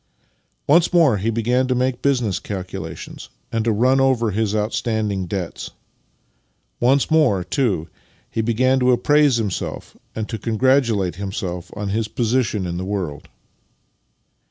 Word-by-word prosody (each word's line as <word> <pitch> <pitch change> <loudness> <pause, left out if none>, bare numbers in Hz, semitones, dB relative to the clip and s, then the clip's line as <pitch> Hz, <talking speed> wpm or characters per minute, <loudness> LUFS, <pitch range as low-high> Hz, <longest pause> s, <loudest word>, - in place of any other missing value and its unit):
Once 170 +4 +4
more 160 -11 +4
he 105 +4 -1
began 120 +3 +1
to 130 - +1
make 125 0 0
business 120 -9 +1
calculations 95 -3 -7 0.2
and 115 -1 0
to 115 - +2
run 125 +5 +3
over 125 -4 +2
his 105 +1 -1
outstanding 105 -3 -1
debts. 90 -2 -4 1.1
Once 135 +5 +2
more, 135 - +3
too, 100 - -1 0.4
he 115 - -2
began 130 +4 +2
to 125 0 +3
appraise 145 +2 +4
himself 105 -6 -4 0.2
and 110 -1 -3
to 115 - -5
congratulate 115 - +1
himself 95 -3 -5
on 105 -1 -3
his 110 +2 -1
position 115 -4 0
in 85 -1 -3
the 90 - -3
world. 90 -7 -4
115 Hz, 135 wpm, -21 LUFS, 100-130 Hz, 1.1 s, Once